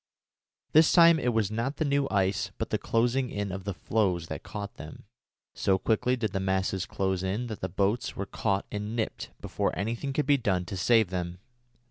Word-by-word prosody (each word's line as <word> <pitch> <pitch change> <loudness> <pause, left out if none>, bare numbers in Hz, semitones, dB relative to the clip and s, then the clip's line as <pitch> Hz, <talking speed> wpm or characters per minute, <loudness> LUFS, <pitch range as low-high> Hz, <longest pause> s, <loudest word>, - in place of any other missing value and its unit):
This 155 +1 +6
time 170 -2 +7
it 125 - +1
was 110 -3 0
not 115 +6 -2
the 160 - 0
new 140 -1 +1
ice 95 -1 +1
but - - -4
the - - +1
closing 120 +3 +1
in 100 -3 -3
of 95 +1 -6
the 100 - -2
floes 90 -7 0
that - - -5
caught 100 0 -7
them. 75 - -10 0.5
So 95 -1 +2
quickly 115 +5 +1
did 110 -5 -2
the 95 - 0
masses 95 0 0
close 95 -1 -1
in 100 +6 -2
that 110 -3 -6
the 95 - -2
boats 100 +6 0
were 100 - -3
caught 100 0 -1
and 105 +2 -4
"nipped" 115 -2 -3
before - - -2
anything 115 +7 -2
could 145 +1 0
be 145 0 +4
done 95 -8 0
to 95 - -5
save 110 +1 +3
them. 90 -1 -3
105 Hz, 200 wpm, -28 LUFS, 95-120 Hz, 0.5 s, time